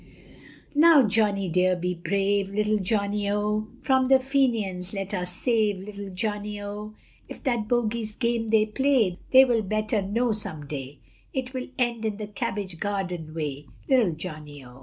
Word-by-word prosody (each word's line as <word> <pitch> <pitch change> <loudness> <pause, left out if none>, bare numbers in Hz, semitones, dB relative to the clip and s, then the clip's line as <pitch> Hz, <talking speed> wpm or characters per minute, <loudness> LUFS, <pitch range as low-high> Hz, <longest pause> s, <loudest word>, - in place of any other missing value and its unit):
Now 305 -1 +7
Johnny 200 -2 +1
dear, 180 +2 +2
be 180 +1 -2
brave, 195 +3 0
Little 210 +1 +1
Johnny, 200 0 0
O, 210 +1 0
From 260 -1 +3
the 265 0 +7
Fenians, 235 -9 0
pray 195 -2 -3
us 180 -2 -2
save, 215 -1 +1
Little 200 +1 -8
Johnny, 210 +1 -3
O, 210 +1 -7 0.3
If - - -10
at 240 -5 0
bogey's 225 -2 -1
game 235 -2 0
they 215 -1 +4
play, 220 -5 +1
They 265 +1 +8
will 240 -3 +2
better 215 +1 0
know 230 +5 0
some 160 -8 -5
day, 140 -1 -6 0.4
It 260 0 -3
will 255 -1 -4
end 240 -3 0
in 215 -2 -2
the 215 - -4
cabbage 200 -3 -4
garden 180 -6 -3
way, 145 -3 -4 0.2
Little 245 -10 +3
Johnny, 150 -3 -8
O. 125 +1 -14
210 Hz, 160 wpm, -26 LUFS, 185-230 Hz, 0.4 s, They